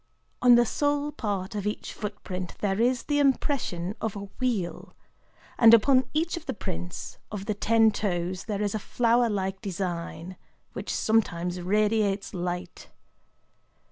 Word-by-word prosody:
On 245 -1 +8
the 240 0 +5
sole 290 +3 0
part 205 -8 -3
of 205 -1 -3
each 210 - -4
footprint 190 -4 -6
there 200 +1 0
is 245 +1 +2
the 290 -1 0
impression 260 - 0
of 220 -2 -2
a 200 - -5 0.2
wheel; 220 -9 -2 0.6
and 230 0 +9
upon 255 +3 +4
each 325 +4 0
of 340 - -9
the - - -2
prints 90 - -6
of 200 -2 -5
the 215 - 0
ten 225 +2 +4
toes 180 -3 -2
there 210 -2 -2
is 205 - -1
a 215 - -1
flower 235 +2 +2
like 190 -2 -2
design, 180 -1 -4 0.4
which - - -5
sometimes 180 -5 0
radiates 205 +1 +1
light. 180 0 -5
210 Hz, 145 wpm, -27 LUFS, 185-235 Hz, 0.6 s, and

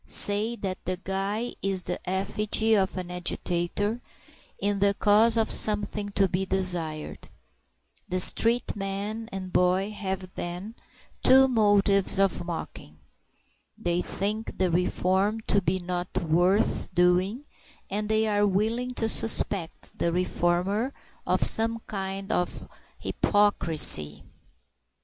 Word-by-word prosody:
Say 210 +3 +2
that 190 -5 -6
the 185 0 -3
guy 195 +5 -2
is 195 -2 -1
the 180 - -4
effigy 210 +3 0
of 195 -2 +1
an 180 -1 -5
agitator 180 +5 -2 0.6
in 205 0 -1
the 200 0 +2
cause 220 +3 +3
of 225 - +1
something 210 -1 +1
to 195 -1 +2
be 180 +1 -2
desired; 175 -5 -3 0.8
the 185 0 -1
street 230 +6 +4
man 205 +3 -4
and 185 -1 -7
boy 185 +3 +1
have 190 -3 -5
then 180 +5 -6 0.5
two 265 +1 +6
motives 205 -5 +2
of 195 -3 +1
mocking: 160 - -8 0.8
they 175 0 -1
think 210 +5 -4
the 185 -2 0
reform 190 +4 0
to 200 -2 0
be 180 +1 -1
not 180 0 -4
worth 180 +5 0
doing, 180 +9 +1 0.4
and 210 +1 -3
they 220 0 +2
are 205 -1 +1
willing 225 +6 -1
to 225 - -1
suspect 200 -6 +2
the 170 - 0
reformer 180 +7 -1 0.3
of - - +1
some 225 +1 +4
kind 195 0 -5
of 180 -5 -3 0.3
hypocrisy. 155 - +3
195 Hz, 120 wpm, -26 LUFS, 180-210 Hz, 0.8 s, two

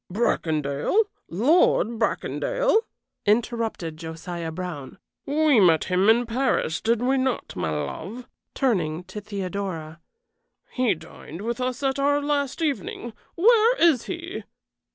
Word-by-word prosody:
"Bracondale? 160 - +1 0.3
Lord 235 - +3
Bracondale?" - - +1 0.5
interrupted 220 -7 0
Josiah 165 +1 -6
Brown. 160 -5 -6 0.3
"We 295 -3 +4
met 165 -5 +5
him 185 +3 +2
in 235 +2 +5
Paris, 235 -8 0
did 230 +1 +1
we 265 +1 +2
not, 260 -2 -2
my 90 -3 -2
love?" 160 - -5 0.3
turning 180 - 0
to 185 +4 -8
Theodora. 185 -5 -5 0.7
"He 250 -6 +1
dined 160 +1 -11
with 235 +2 -3
us 255 +1 -2
our 275 +2 +2
last 290 +1 -1
evening. 240 -4 -3 0.2
Where 460 +5 +5
is 325 -8 +4
he?" 345 +2 -5
225 Hz, 115 wpm, -25 LUFS, 170-275 Hz, 0.7 s, met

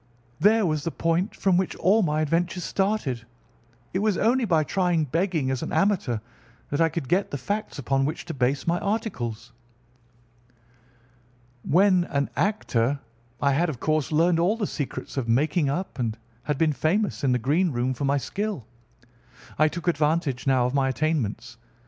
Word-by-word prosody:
There 210 +4 +4
was 155 -3 0
the 165 - -1
point 165 +4 -1
from 190 -3 +2
which 185 0 -1
all 200 +6 +3
my 155 -4 +1
adventures 170 +3 0
started. 190 - -1 0.7
It 185 - 0
was 210 -2 +1
only 240 +3 +2
by 165 -6 +3
trying 175 0 +1
begging 160 -2 0
as 130 - -2
an - - -4
amateur 195 - +1 0.5
that 145 - 0
I 165 - +4
could 160 -4 -4
get 190 +6 +1
the 140 - -3
facts 205 +10 -3
upon 135 0 0
which 150 - -3
to 165 - -5
base 130 +1 0
my 170 +1 +1
articles. 125 - -3 2.1
When 180 +4 +3
an 140 -3 -1
actor 145 - 0 0.4
I 140 - +2
had, 165 +5 +2
of 135 -6 -5
course, 155 -2 0
learned 165 +2 +3
all 190 +7 +2
the 215 - -1
secrets 140 -5 -5
of 120 -4 -2
making 145 +5 +2
up, 175 0 -3
and 115 -2 -1 0.3
had 150 -2 -1
been 155 0 +2
famous 190 +6 0
in 135 - +3
the 125 - +3
green 155 +9 +1
room 125 +1 0
for 135 +3 -3
my 140 +1 +2
skill. 200 - -3 0.9
I 155 - +6
took 170 +3 -6
advantage 150 -5 0
now 130 -2 +3
of 125 - -1
my 135 -1 +2
attainments. 135 -7 -2
155 Hz, 175 wpm, -25 LUFS, 135-185 Hz, 2.1 s, I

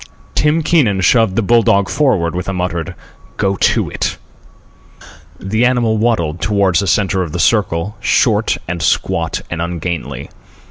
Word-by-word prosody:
Tim 150 +2 +1
Keenan 120 - +2
shoved 110 +1 +3
the 115 - +1
bull 120 +3 +4
dog 100 -2 +2
forward 90 - +1
with 90 +2 -4
a - - -2
muttered 90 -3 -3 0.4
"Go 100 0 0
to - - +1
it." - - -3 1.2
The 110 +5 -1
animal 120 -3 +2
waddled 85 -8 0
toward 100 +1 +1
the 100 - 0
centre 95 0 +1
of 85 -4 -4
the 90 - -3
circle, 100 -1 0
short - - +1
and 85 0 -4
squat - - 0
and 85 -1 -3
ungainly. 85 -5 -4
95 Hz, 150 wpm, -16 LUFS, 85-115 Hz, 1.2 s, bull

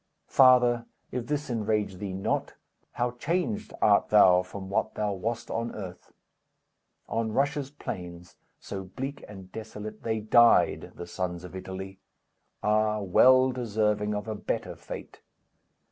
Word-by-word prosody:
Father, 125 -2 +5 0.2
if 120 -1 -4
this 150 0 -2
enrage 105 -4 -1
thee 100 +1 -5
not, 95 +1 -2 0.4
How 120 0 0
changed 180 - -2
art 100 -1 +4
thou 90 -4 +7
from 95 +1 -8
what 100 +2 -1
thou 105 -1 -1
wast 110 +5 -4
on 115 +1 -3
earth! 95 -4 -8 1.0
On 115 -1 -1
Russia's 140 +2 0
plains, 90 - -8 0.2
so 95 -1 -6
bleak 135 +9 -6
and 95 -2 -11
desolate, 110 0 -8
They 110 -1 -1
died, 115 +2 +4
the 85 - -7
sons 90 0 -4
of 90 +1 -9
Italy; 95 +1 -7 0.6
Ah, 105 0 +2
well 130 +7 +5
deserving 105 -3 0
of 105 +2 -4
a 110 - -2
better 105 - -3
fate! - - -9
105 Hz, 135 wpm, -28 LUFS, 95-120 Hz, 1.0 s, thou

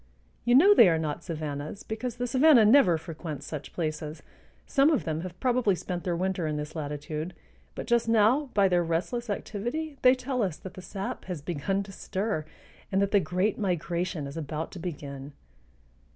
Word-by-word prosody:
You 240 - +4
know 380 +10 +8
they 225 - +8
are 165 - +2
not 155 0 -3
savannas, 155 +1 -5
because 225 +2 -4
the 245 0 -2
savanna 255 -1 +6
never 210 - +6
frequents 155 -3 -7
such 150 -1 -6
places. 155 -2 -4 0.4
Some 280 0 +4
of 310 - +2
them 160 0 -2
have 180 0 -8
probably 245 -6 +2
spent 175 +1 -5
their 175 -2 0
winter 185 -1 -1
in 150 -1 -2
this 150 +2 -5
latitude; 150 +2 -4 0.4
but - - -5
just 235 0 +2
now 230 +6 +4
by 200 -2 +5
their 175 -2 +2
restless 180 +9 -2
activity 240 +9 -4
they 255 0 +6
tell 255 0 -2
us 185 -7 -1
that 190 - -9
the 185 - -9
sap 195 +2 -5
has 175 -6 -5
begun 180 +5 -1
to 195 - -11
stir 190 -3 -3 0.5
and 195 - +2
that 200 0 +1
the 205 - +5
great 185 +4 0
migration 175 -4 -1
is 140 +3 -7
about 155 0 -4
to 185 - -8
begin. 145 -5 -6
185 Hz, 185 wpm, -28 LUFS, 160-225 Hz, 0.5 s, know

